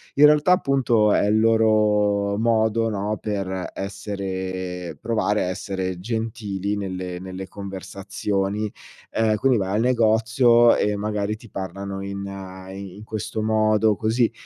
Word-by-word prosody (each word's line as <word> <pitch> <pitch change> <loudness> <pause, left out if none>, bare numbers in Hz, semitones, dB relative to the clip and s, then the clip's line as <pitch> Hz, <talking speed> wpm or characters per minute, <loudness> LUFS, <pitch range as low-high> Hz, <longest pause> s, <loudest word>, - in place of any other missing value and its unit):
In 145 - +7
realtà 150 +4 +5
appunto, 125 -9 +2
è - - +3
il 105 +1 +3
loro 105 -2 +3
modo, 115 0 +2
no, 105 0 -2
per 95 -3 -3
essere 95 -3 -5
provare 105 -2 0
a - - -2
essere 95 -1 -3
gentili 105 -2 -3
nelle 90 -2 -4
nelle 95 0 -7
conversazioni, 100 +1 -3 0.4
ehm, 110 -1 +2
quindi 125 +3 +2
vai 95 -1 -1
al 110 - +2
negozio 120 0 +4
e 105 0 +1
magari 105 0 -2
ti 110 +1 -15
parlano 95 +1 -5
in 100 0 -5 0.5
i 95 -1 -8
in 105 - -11
questo 110 0 -4
modo 110 -1 +2
così. 115 +2 +1
105 Hz, 135 wpm, -23 LUFS, 95-110 Hz, 0.5 s, In